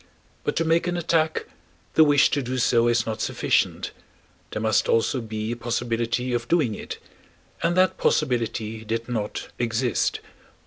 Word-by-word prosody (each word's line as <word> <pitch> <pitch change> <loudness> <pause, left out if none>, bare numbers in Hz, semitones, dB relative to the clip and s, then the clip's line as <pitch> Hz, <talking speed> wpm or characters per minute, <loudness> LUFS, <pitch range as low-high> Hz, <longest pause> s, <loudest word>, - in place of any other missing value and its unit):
But - - -1
to 165 - +1
make 165 +2 +2
an 175 0 -1
attack 160 -2 +1 0.5
the 160 - +7
wish 145 -2 +5
to 145 - +1
do 130 0 -3
so 115 -1 +3
is 120 -1 +2
not 110 -1 -3
sufficient, - - 0 0.6
there - - -4
must 110 0 +2
also 120 +3 +2
be 110 0 -4
a - - -2
possibility 120 +1 -1
of 120 0 -1
doing 150 -10 +2
it, - - -7 0.6
and 175 +2 +1
that 185 -1 +3
possibility 115 -5 0
did 115 +1 -3
not 110 -4 -3
exist. 120 0 0
120 Hz, 160 wpm, -24 LUFS, 115-145 Hz, 0.6 s, the